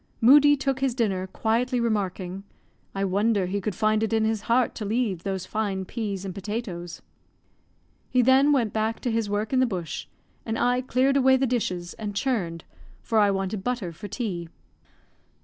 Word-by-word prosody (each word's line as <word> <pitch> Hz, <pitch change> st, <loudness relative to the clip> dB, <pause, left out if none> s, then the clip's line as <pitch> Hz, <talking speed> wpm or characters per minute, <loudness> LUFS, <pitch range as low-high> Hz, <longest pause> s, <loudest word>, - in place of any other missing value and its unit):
Moodie 290 Hz, +4 st, +7 dB
took 270 Hz, -1 st, -1 dB
his 265 Hz, -3 st, 0 dB
dinner, 195 Hz, -6 st, 0 dB
quietly 240 Hz, +5 st, 0 dB
remarking, 195 Hz, -4 st, -2 dB, 0.5 s
"I 195 Hz, 0 st, 0 dB
wonder 200 Hz, +1 st, +1 dB
he 200 Hz, +3 st, -2 dB
could 200 Hz, 0 st, -3 dB
find 215 Hz, 0 st, +2 dB
it 220 Hz, -, 0 dB
in 220 Hz, -1 st, +2 dB
his 220 Hz, -1 st, 0 dB
heart 240 Hz, 0 st, +3 dB
to 220 Hz, -, -6 dB
leave 210 Hz, -4 st, -1 dB
those 190 Hz, -1 st, -3 dB
fine 200 Hz, -2 st, -2 dB
peas 200 Hz, -2 st, -4 dB
and 190 Hz, -, -4 dB
potatoes." 195 Hz, -4 st, -5 dB, 1.1 s
He 250 Hz, -1 st, +3 dB
then 265 Hz, +4 st, +5 dB
went 240 Hz, -7 st, +1 dB
back 220 Hz, +1 st, -1 dB
to 245 Hz, -, -1 dB
his 225 Hz, -2 st, -1 dB
work 210 Hz, +4 st, -2 dB
in 260 Hz, -, +4 dB
the 255 Hz, -, +4 dB
bush, 180 Hz, -7 st, -5 dB, 0.4 s
and 225 Hz, 0 st, -3 dB
I 245 Hz, +1 st, +2 dB
cleared 260 Hz, +2 st, +2 dB
away 265 Hz, -1 st, +5 dB
the 265 Hz, -, +1 dB
dishes, 185 Hz, -8 st, -2 dB
and 205 Hz, -2 st, -4 dB
churned, 190 Hz, -10 st, -1 dB, 0.4 s
for 225 Hz, -, +1 dB
I 205 Hz, -1 st, +5 dB
wanted 195 Hz, 0 st, -2 dB
butter 240 Hz, -8 st, -2 dB
for 205 Hz, +6 st, -8 dB
tea. 190 Hz, -6 st, -4 dB
220 Hz, 180 wpm, -25 LUFS, 195-245 Hz, 1.1 s, Moodie